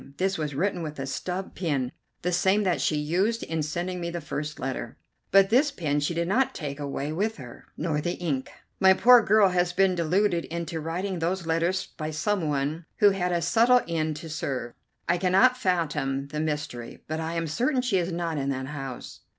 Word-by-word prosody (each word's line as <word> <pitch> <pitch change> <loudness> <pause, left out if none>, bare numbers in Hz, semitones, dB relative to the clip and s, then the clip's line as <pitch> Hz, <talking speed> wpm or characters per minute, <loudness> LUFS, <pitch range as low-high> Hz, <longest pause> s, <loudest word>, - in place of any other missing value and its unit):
This 190 +1 +1
was 150 -4 -3
written 180 +3 0
with 155 -2 -5
a 135 - -3
stub 180 +7 -4
pen, 140 -8 -1 0.3
the 180 - 0
same 190 +4 +3
that 185 -3 +1
she 155 - +1
used 185 +10 0
in 160 -1 -2
sending 175 +4 -3
me 170 - -2
the 170 0 -4
first 150 -1 -5
letter; 130 -3 -4 0.3
but 195 +1 +5
this 275 +6 +5
pen 150 - -1
she 145 +4 -1
did 170 0 0
not 260 +7 +1
take 145 -3 -5
away 145 0 -3
with 210 +6 -1
her, 125 -5 -11
nor 150 -3 -1
the 175 +3 -1
ink. 145 -7 -2 0.3
My 190 0 +7
poor 245 +3 +7
girl 210 -2 +5
has 180 -1 +1
been 190 0 +3
deluded 175 +1 +1
into 170 -1 -4
writing 180 +4 -3
those 175 +2 -1
letters 170 +3 0
by 155 -1 -6
some 160 +2 -1
one 145 +4 -2
who 205 -1 +6
had 180 -2 -1
a 170 -1 0
subtle 245 +2 +5
end 160 -2 -1
to 160 +2 -8
serve. 135 -6 -3 0.3
I 175 - +2
cannot 195 +8 +4
fathom 150 - -1
the 150 - -4
mystery, 150 -6 -4
but 155 +1 -3
I 160 +1 -3
am 165 0 -1
certain 250 - 0
she 215 -7 +2
is 175 +1 -2
not 170 -3 -2
in 135 0 -1
that 130 -1 -2
house." 135 -4 -7
170 Hz, 205 wpm, -26 LUFS, 150-190 Hz, 0.3 s, My